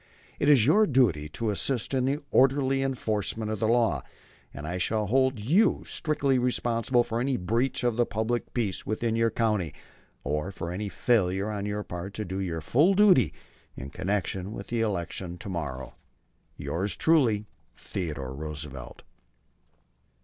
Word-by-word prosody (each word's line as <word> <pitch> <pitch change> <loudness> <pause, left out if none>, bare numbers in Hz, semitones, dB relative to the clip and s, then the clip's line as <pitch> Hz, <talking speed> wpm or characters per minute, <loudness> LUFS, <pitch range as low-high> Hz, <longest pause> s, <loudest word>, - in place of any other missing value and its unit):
It 145 - +2
is 135 -7 +6
your 205 - +5
duty 100 - +2
to 110 +8 -2
assist 120 +5 0
in 130 -1 +1
the 140 +3 0
orderly 135 0 +3
enforcement 110 -4 -2
of 110 - -3
the 110 - +1
law, 115 - +2 0.5
and 75 - -8
I 90 +3 -3
shall 105 +3 0
hold 130 +2 +2
you 160 - +3
strictly 140 -4 0
responsible 120 0 +1
for 115 -1 -3
any 130 +1 0
breach 115 +9 -1
of 120 -2 +1
the 120 - +3
public 110 +3 -2
peace 110 -6 -1
within 110 +1 -1
your 115 0 +3
county, 105 -7 0 0.5
or 75 +7 -2
for 85 -3 -5
any 100 +3 -3
failure 100 -3 +1
on 100 -1 -3
your 105 0 -2
part 90 +2 -7
to 105 - -3
do 95 +1 -4
your 85 -4 -3
full 155 - +3
duty 185 - +5 0.5
in 65 +2 -7
connection 95 0 -2
with 100 - -8
the 115 -1 0
election 90 -4 -3
to 100 +2 -8
morrow. 65 -8 -5 0.6
Yours 85 +8 -2
truly, 125 -11 +3 0.3
THEODORE 75 -8 -5
ROOSEVELT. 70 -3 -7
110 Hz, 155 wpm, -27 LUFS, 90-125 Hz, 0.6 s, is